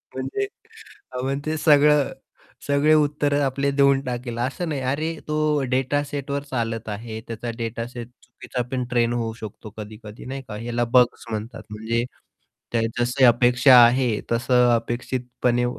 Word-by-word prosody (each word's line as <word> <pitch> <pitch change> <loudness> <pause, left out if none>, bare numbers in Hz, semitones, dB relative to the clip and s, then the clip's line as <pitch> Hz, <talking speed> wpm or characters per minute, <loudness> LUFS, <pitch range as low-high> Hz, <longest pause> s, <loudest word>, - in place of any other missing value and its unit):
म्हणजे 405 0 -2 0.6
अ, 125 - -6
मग 135 +1 -1
ते 155 0 -1
सगळं 150 -2 +4 0.6
सगळे 145 +2 +3
उत्तर 145 -1 +2
आपले 140 +1 0
देऊन 140 -1 +4
टाकेल, 120 -1 -4
असं 140 +7 -2
नाही. 140 -3 -2
अरे 155 +6 -1
तो 150 -1 +1
डेटासेटवर 140 +1 -1
चालत 115 -3 -2
आहे, 110 +1 -6
त्याचा 115 +1 -5
डेटासेट 115 +1 -5 0.2
चुकीचापण 125 +1 -4
ट्रेन 120 -1 +1
होऊ 115 -2 -2
शकतो 110 0 -9
कधी-कधी 105 +1 -9
नाही 135 +1 -5
का 105 - -6
याला 120 +1 -2
बग्स 125 -1 +3
म्हणतात, 110 +2 -5
म्हणजे 110 +2 -2 0.7
त्या 115 -1 +1 0.2
जशी 125 +2 +1
अपेक्षा 125 +2 +6
आहे 125 +1 +3 0.2
तसं 125 +1 +3
अपेक्षितपणे 120 +1 -1
125 Hz, 135 wpm, -23 LUFS, 115-140 Hz, 0.7 s, अपेक्षा